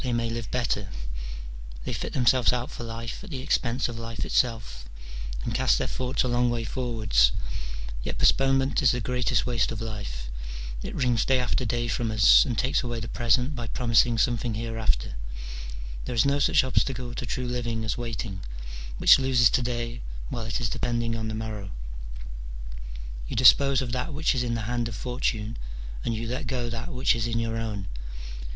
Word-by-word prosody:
301 - - -3
they 115 -1 0
may - - -3
live 115 -4 -4
better; 120 -5 0 0.9
they - - -3
fit - - -4
themselves 125 -1 +4
out 125 0 -2
for - - -6
life 115 - -5
at 205 - -9
the 145 - -4
expense 130 -1 +1
of 120 -1 -6
life 115 0 -4
itself, 110 - 0 0.6
and - - -2
cast - - +3
their - - 0
thoughts 130 +1 0
a - - 0
long 120 0 +2
way 120 -1 -1
forwards: 110 - +2 0.7
yet - - -3
postponement 135 +1 +4
is 125 -5 +5
the 125 - -1
greatest 125 +1 +1
waste 115 -4 +1
of 115 - -4
life: 105 - -5 0.5
it - - -5
wrings 125 -3 +2
day 130 - +3
after 125 +1 0
day 120 +1 0
from 120 0 0
us, 110 -3 +7
and 120 -3 -2
takes 130 +1 +2
away 120 -2 -3
the 110 - -5
present 125 +5 +2
by 120 -2 -4
promising 115 0 +3
something 120 0 +1
hereafter: 110 - -1 0.9
there 125 - -3
is 115 - +4
no 140 +1 +3
such 140 - +5
obstacle 130 -1 0
to - - -4
true 125 - -2
living 120 -2 -2
as 110 - 0
waiting, 115 -5 -4 0.6
which - - +8
loses 130 -3 +5
to - - +3
day 120 -1 -2 0.3
while 115 - -3
it 115 - -1
is 120 - 0
depending 115 +1 -1
on 110 -1 -3
the 110 - -3
morrow. 110 -3 -4 1.6
You - - -4
dispose 140 -1 +6
of 125 - -4
that 130 +5 -2
which 155 +1 +2
is 130 - 0
in 120 -1 0
the 115 - -2
hand 120 +2 -1
of 115 - -5
Fortune, 115 -2 -2 0.5
and 115 - 0
you 115 +1 -3
let 125 +2 -3
go 120 -3 -2
that 115 +1 -4
which 125 0 +3
is 115 -1 0
in 115 0 -1
your 115 0 -1
own. 105 -4 -3
120 Hz, 190 wpm, -27 LUFS, 115-125 Hz, 1.6 s, which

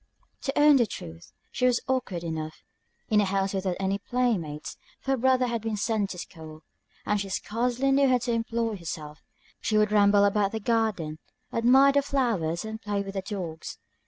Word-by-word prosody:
To 270 0 -1
own 295 -1 +7
the 240 -3 +3
truth, 80 - -9 0.2
she 250 - +1
was 245 -1 +3
awkward 250 -10 -1
enough, 160 -1 -5 0.5
in 210 -2 +4
a - - +2
house 195 0 0
without 190 -2 -1
any 195 +1 0
play 245 +2 +1
mates; 150 -4 -6 0.2
for 270 - -3
her 270 - +2
brother 255 +1 +3
had 235 -2 -2
been 220 -1 -2
sent 210 -1 0
to 180 - -6
school, 160 -3 -10 0.4
and 210 -1 +1
she 200 - -5
scarcely 245 +6 0
knew 275 0 +4
how 255 - +4
to 245 0 -2
employ 230 -1 -1
herself; 155 -3 -7 0.4
she 215 - 0
would 210 0 +3
ramble 205 -1 +5
about 200 0 +1
the 220 - -2
garden, 205 -9 0 0.3
admire 260 +4 +5
the 280 0 +3
flowers, 225 - -1
and 220 0 -6
play 205 -1 -2
with 195 0 -7
the 195 - -2
dogs. 185 -6 -6
210 Hz, 190 wpm, -27 LUFS, 190-240 Hz, 0.5 s, own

